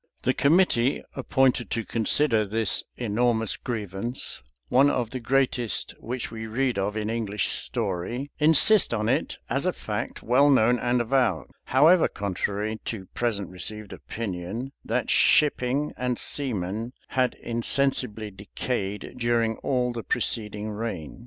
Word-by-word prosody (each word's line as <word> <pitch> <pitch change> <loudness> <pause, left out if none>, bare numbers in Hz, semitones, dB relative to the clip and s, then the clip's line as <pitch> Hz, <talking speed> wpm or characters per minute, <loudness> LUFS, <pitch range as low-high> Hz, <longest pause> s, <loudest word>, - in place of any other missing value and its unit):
The 130 - +2
committee 140 -5 +3
appointed 130 -3 +1
to 115 - -2
consider 115 +1 +2
this 105 0 -1
enormous 115 -1 0
grievance, 110 +1 -4 0.3
one 135 +3 +4
of 120 -5 -1
the 130 - -4
greatest 125 -2 0
which 120 0 -4
we 110 -1 -6
read 125 -1 0
of 105 +2 -2
in 105 -1 -2
English 110 -3 -1
story, 115 +10 -3
insist 160 - +6
on 105 -1 -1
it - - 0
as - - -1
a - - +3
fact - - -5
well 135 +5 +4
known 125 -2 +4
and 120 0 +1
avowed, 115 - 0
however 160 +6 +5
contrary 105 +2 -3
to 105 -5 -4
present 100 -6 -1
received 105 +3 -4
opinion, 110 +4 -5
that - - -1
shipping 145 0 +3
and 125 -1 -2
seamen 115 -3 -1 0.2
had 130 -1 +1
insensibly 115 -2 0
decayed 100 +1 -4
during 115 -2 +1
all 125 -2 -1
the 115 - -4
preceding 105 -1 -1
reign. 105 -8 -5
115 Hz, 135 wpm, -25 LUFS, 105-130 Hz, 0.3 s, insist